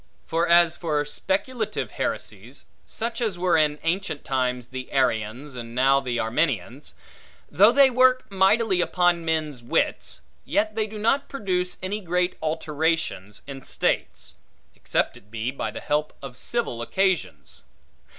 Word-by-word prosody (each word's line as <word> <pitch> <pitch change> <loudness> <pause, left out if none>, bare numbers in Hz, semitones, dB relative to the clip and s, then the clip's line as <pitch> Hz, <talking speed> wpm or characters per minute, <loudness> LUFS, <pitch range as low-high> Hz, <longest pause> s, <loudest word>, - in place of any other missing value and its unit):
For 165 +1 0
as 170 0 +5
for 150 -4 -1
speculative 195 - -2
heresies - - -4 0.2
(such 230 +2 -3
as 215 -6 0
were 180 0 +2
in 150 -2 +3
ancient 165 -3 -2
times 125 -2 -1
the 130 0 -7
Arians, 125 +1 0
and 120 -1 -8
now 135 +2 +4
the 125 -3 -3
Arminians), 120 - -1 0.6
though 200 +9 +6
they 275 0 +6
work 255 +1 +4
mightily 195 0 +3
upon 175 -1 +2
men's 155 -5 -2
wits, 120 - -1 0.2
yet 215 +1 0
they 220 0 -1
do 215 0 -8
not 230 +6 +1
produce 180 -8 -2
any 200 +3 -2
great 180 0 0
alterations 155 - -2
in 135 -1 -8
states; - - -2 0.4
except - - -1
it 105 - -20
be 110 +3 -3
by 135 - -3
the - - -7
help 150 +1 -1
of 135 -2 -8
civil 125 - -2
occasions. 175 - -1
160 Hz, 140 wpm, -24 LUFS, 130-195 Hz, 0.6 s, though